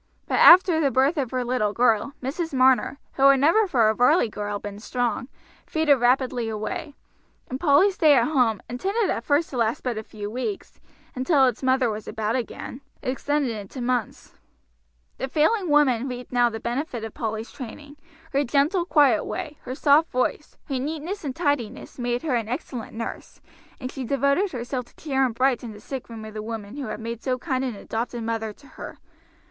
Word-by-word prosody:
But -, -, +1 dB
after 350 Hz, -2 st, +8 dB
the 290 Hz, -3 st, +3 dB
birth 270 Hz, +6 st, +2 dB
of 265 Hz, -5 st, -1 dB
her 255 Hz, 0 st, -2 dB
little 235 Hz, -4 st, 0 dB
girl 235 Hz, +3 st, +2 dB
Mrs. 295 Hz, +3 st, -3 dB
Marner, 260 Hz, +1 st, +3 dB, 0.2 s
who 275 Hz, 0 st, +6 dB
had 275 Hz, -1 st, +5 dB
never 335 Hz, +10 st, +4 dB
for 240 Hz, -10 st, +3 dB
a 215 Hz, -, +3 dB
Varley 250 Hz, +3 st, +3 dB
girl 205 Hz, -1 st, -4 dB
been 205 Hz, 0 st, -8 dB
strong, 245 Hz, +2 st, -2 dB, 0.4 s
faded 315 Hz, -3 st, +3 dB
rapidly 245 Hz, -1 st, +1 dB
away; 290 Hz, -, -4 dB, 0.6 s
and 260 Hz, -, -3 dB
Polly's 330 Hz, +6 st, +4 dB
stay 310 Hz, -5 st, +5 dB
at 240 Hz, -, +4 dB
home, 245 Hz, -9 st, +1 dB
intended 390 Hz, -, -1 dB
at 230 Hz, -, -2 dB
first 290 Hz, +5 st, +1 dB
to 260 Hz, -, -4 dB
last 230 Hz, -1 st, 0 dB
but 240 Hz, -4 st, -2 dB
a -, -, -7 dB
few 210 Hz, -1 st, -7 dB
weeks, 260 Hz, -, -5 dB, 0.3 s
until 265 Hz, +1 st, +3 dB
its 250 Hz, -4 st, 0 dB
mother 260 Hz, -1 st, +2 dB
was 215 Hz, -1 st, -4 dB
about 220 Hz, +1 st, -2 dB
again, 250 Hz, +1 st, -5 dB, 0.2 s
extended 275 Hz, +1 st, -1 dB
into 205 Hz, +5 st, -8 dB
months. 245 Hz, -3 st, -2 dB, 0.9 s
The 265 Hz, -, -2 dB
failing 330 Hz, -, +1 dB
woman 270 Hz, -4 st, +3 dB
reaped 250 Hz, -1 st, -7 dB
now 245 Hz, -1 st, +3 dB
the 225 Hz, -1 st, -6 dB
benefit 240 Hz, 0 st, -3 dB
of 225 Hz, -, -6 dB
Polly's 220 Hz, -1 st, -4 dB
training. 285 Hz, +2 st, -9 dB, 0.4 s
Her 280 Hz, +1 st, +2 dB
gentle, 290 Hz, +8 st, +1 dB
quiet 285 Hz, -, +4 dB
way, 300 Hz, -1 st, -5 dB
her 255 Hz, -, -4 dB
soft 295 Hz, +3 st, +4 dB
voice, 255 Hz, +4 st, -2 dB
her 270 Hz, -3 st, -2 dB
neatness 320 Hz, +8 st, -4 dB
and 270 Hz, -3 st, -4 dB
tidiness, 280 Hz, -7 st, -2 dB
made 245 Hz, 0 st, -1 dB
her 305 Hz, -5 st, -1 dB
an 230 Hz, -2 st, -1 dB
excellent 245 Hz, -4 st, -5 dB
nurse, 230 Hz, -, -6 dB, 0.4 s
and 255 Hz, -1 st, -5 dB
she 270 Hz, -, -5 dB
devoted 280 Hz, -, +1 dB
herself 250 Hz, 0 st, -4 dB
to -, -, -24 dB
cheer 270 Hz, -4 st, 0 dB
and 245 Hz, -4 st, 0 dB
brighten 245 Hz, -2 st, 0 dB
the 210 Hz, -, -12 dB
sickroom 230 Hz, -2 st, -7 dB
of 215 Hz, -, -10 dB
the 215 Hz, -, -5 dB
woman 220 Hz, +2 st, -6 dB
who 280 Hz, -, -4 dB
had -, -, -5 dB
made 230 Hz, 0 st, -5 dB
so 255 Hz, -1 st, -1 dB
kind 260 Hz, -1 st, -2 dB
an 250 Hz, -4 st, -3 dB
adopted 230 Hz, +3 st, -4 dB
mother 225 Hz, -1 st, -2 dB
to 280 Hz, -, -19 dB
her. -, -, -10 dB
255 Hz, 190 wpm, -24 LUFS, 230-285 Hz, 0.9 s, after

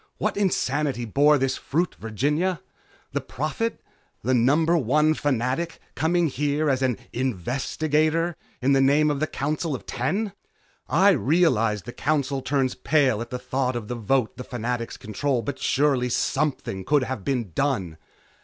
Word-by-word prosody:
What -, -, -1 dB
insanity 145 Hz, -9 st, 0 dB
bore 145 Hz, +6 st, +4 dB
this 135 Hz, -1 st, 0 dB
fruit, 170 Hz, +5 st, -1 dB
Virginia? 150 Hz, -, 0 dB, 0.5 s
The -, -, -1 dB
Prophet, 155 Hz, -, -3 dB, 0.4 s
the 130 Hz, +4 st, +1 dB
number 150 Hz, +8 st, +3 dB
one 150 Hz, +2 st, +3 dB
Fanatic, 135 Hz, +2 st, -1 dB, 0.2 s
coming 170 Hz, +2 st, +1 dB
here 145 Hz, +1 st, 0 dB
as 130 Hz, -1 st, 0 dB
an 125 Hz, -4 st, +1 dB, 0.2 s
investigator 150 Hz, -, 0 dB, 0.3 s
in 140 Hz, +2 st, +4 dB
the 135 Hz, -, +4 dB
name 145 Hz, +3 st, +4 dB
of 145 Hz, -, -2 dB
the 155 Hz, -, 0 dB
Council 150 Hz, +3 st, -2 dB
of -, -, -9 dB
Ten! 195 Hz, -, -2 dB, 0.6 s
I 190 Hz, +6 st, +5 dB
realize 130 Hz, -, +2 dB
the 120 Hz, -, -8 dB
Council 140 Hz, -2 st, 0 dB
turns 135 Hz, -1 st, 0 dB
pale 135 Hz, -8 st, +2 dB
at 120 Hz, -, -6 dB
the 125 Hz, -, -3 dB
thought 130 Hz, 0 st, -1 dB
of 110 Hz, -3 st, -5 dB
the 125 Hz, -, -2 dB
vote 120 Hz, +1 st, 0 dB
the 125 Hz, -, -5 dB
Fanatics 120 Hz, -1 st, -4 dB
control, 120 Hz, +4 st, -1 dB
but 140 Hz, -, -4 dB
surely 135 Hz, -3 st, +2 dB
something 135 Hz, -7 st, -1 dB
could 145 Hz, +6 st, +2 dB
have 130 Hz, -6 st, -4 dB
been 120 Hz, -7 st, -1 dB
done! 100 Hz, -, -1 dB
135 Hz, 155 wpm, -25 LUFS, 125-155 Hz, 0.6 s, I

